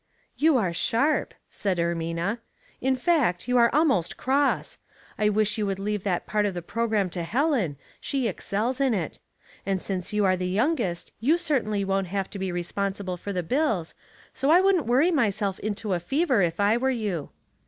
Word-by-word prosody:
*' - - -43
You 320 -4 +6
are 185 -7 0
sharp," 275 - +1 0.2
said 195 -3 -2
Ermina. 170 +5 -1 0.2
*' - - -33
In 265 - +3
fact, 255 - +1
you 250 0 +2
are 235 0 +6
almost 275 - +2
cross. 275 +2 0 0.4
I 210 0 +3
wish 210 +1 +1
you 210 - 0
would 195 -1 -1
leave 205 0 -2
that 180 -3 0
part 210 -1 +1
of 195 - -4
the 175 - -4
programme 215 -2 0
to 175 - -4
Helen, 225 - 0 0.2
she 270 -4 -1
excels 225 +6 -2
in 260 -5 +3
it; 170 -6 -4 0.4
and 195 -1 -1
since 185 -1 -4
you 210 -1 +1
are 185 -1 +4
the 180 0 -2
youngest 215 - 0
you 290 +10 +3
certainly 245 - 0
won't 195 -1 0
have 195 +1 -3
to 200 - -6
be 190 -1 -2
responsible 190 +2 -3
for 200 +3 -6
the 180 -2 -2
bills, 220 - 0 0.4
so 270 - -2
1 345 +5 +6
wouldn't 375 - +3
worry 270 +9 +4
myself 210 - 0
into 210 -1 -2
a 175 - 0
fever 265 - +1
if 170 0 0
I 205 +3 +3
were 260 +2 +1
you." 210 - -2
210 Hz, 195 wpm, -26 LUFS, 185-260 Hz, 0.4 s, You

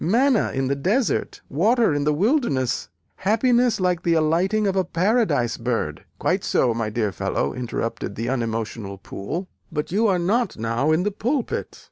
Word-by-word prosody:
Manna 240 +5 +3
in 135 0 -1
the 140 - +1
desert 210 - 0
water 220 - +3
in 145 0 0
the 150 - +3
wilderness 155 - +1 0.3
happiness 240 +3 +2
like 180 -2 +1
the 170 -1 +2
alighting 175 +7 +2
of 195 -1 +1
a 190 - +3
paradise 175 - +1
bird 115 -11 -2
" - - -43
"Quite - - 0
so, 120 -3 +2
my 115 -1 -2
dear 105 -2 -1
fellow," 70 -5 -1
interrupted 115 -4 -4
the 115 +2 -3
unemotional 115 -4 -3
Poole, 130 - -5 0.2
"but 150 -1 -3
you 220 +4 +3
are 190 -3 +3
not 210 +8 0
now 115 +6 0
in 160 +3 +2
the 210 - 0
pulpit. 245 +6 -2
165 Hz, 170 wpm, -23 LUFS, -, 0.3 s, Manna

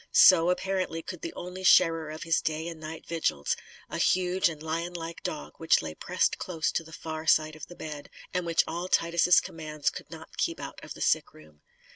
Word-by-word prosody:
So, 175 -2 +7
apparently, 185 -3 -1
could 185 -3 -7
the 170 - -4
only 180 +1 -7
sharer 165 -4 +5
of 155 +1 -6
his 165 -1 +2
day 160 +1 -2
and 165 -2 -7
night 155 +1 -8
vigils 160 - 0 0.3
a - - -5
huge 185 0 +3
and 155 -2 -7
lionlike 165 +1 -4
dog 150 - -5
which 165 - +3
lay 80 - -5
pressed - - 0
close 165 -3 -1
to - - -1
the 160 - -14
far 160 0 -6
side 155 0 +4
of 155 - -9
the 175 - -11
bed, 150 -3 -7 0.2
and 180 -1 0
which 170 -1 +3
all 175 +2 -3
Titus' 170 0 +4
commands 155 -2 -3
could - - -9
not - - -11
keep - - 0
out - - -8
of - - -8
the - - -11
sick - - +1
room. 75 -1 -17
165 Hz, 205 wpm, -28 LUFS, 155-175 Hz, 0.3 s, So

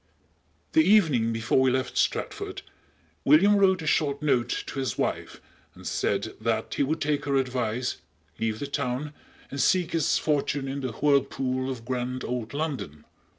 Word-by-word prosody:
"_ - - -41
The 320 - +6
evening 160 - +4
before 115 +2 +1
we 130 - +4
left 130 0 -1
Stratford - - -1 0.6
William 180 +9 +6
wrote 190 -3 +3
a - - -6
short 145 -2 +1
note 125 -5 +1
to 135 - -5
his 130 -6 -2
wife - - -2 0.4
and - - -14
said - - -1
that - - -1
he - - -1
would 155 +4 0
take 145 -1 -1
her 140 -1 0
advice, 125 -2 -1 0.4
leave 110 -1 -1
the 145 - -4
town, 140 +1 -3 0.4
and 140 - -2
seek 180 -3 +2
his 165 -3 +2
fortune 145 -2 0
in 140 +1 -4
the 130 -4 -3
whirlpool 135 -1 +1
of 120 -3 -6
grand 125 0 -3
old 120 -2 -3
London. 140 - -4
135 Hz, 165 wpm, -26 LUFS, 125-150 Hz, 0.6 s, The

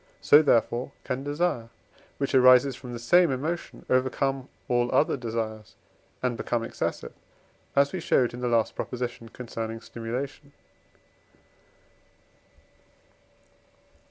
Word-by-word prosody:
so, 145 - +7
therefore, 120 -2 +1
can 130 +1 -3
desire, 145 -5 -1 0.5
which 140 0 -2
arises 130 0 +6
from 125 -1 -9
the 120 - -5
same 170 +9 +4
emotion, 155 +6 -4
overcome 130 +1 0 0.2
all 120 0 +1
other 155 - +3
desires, 110 -4 -5 0.5
and 125 -2 0
become 120 -1 -1
excessive, 115 - -4 0.6
as 140 0 +3
we 185 - -2
showed 125 -7 +2
in 120 - -7
the 125 - -1
last 115 -2 +2
proposition 120 -2 -5
concerning 115 -2 -6
stimulation. 130 +6 -6
125 Hz, 110 wpm, -27 LUFS, 115-140 Hz, 0.6 s, so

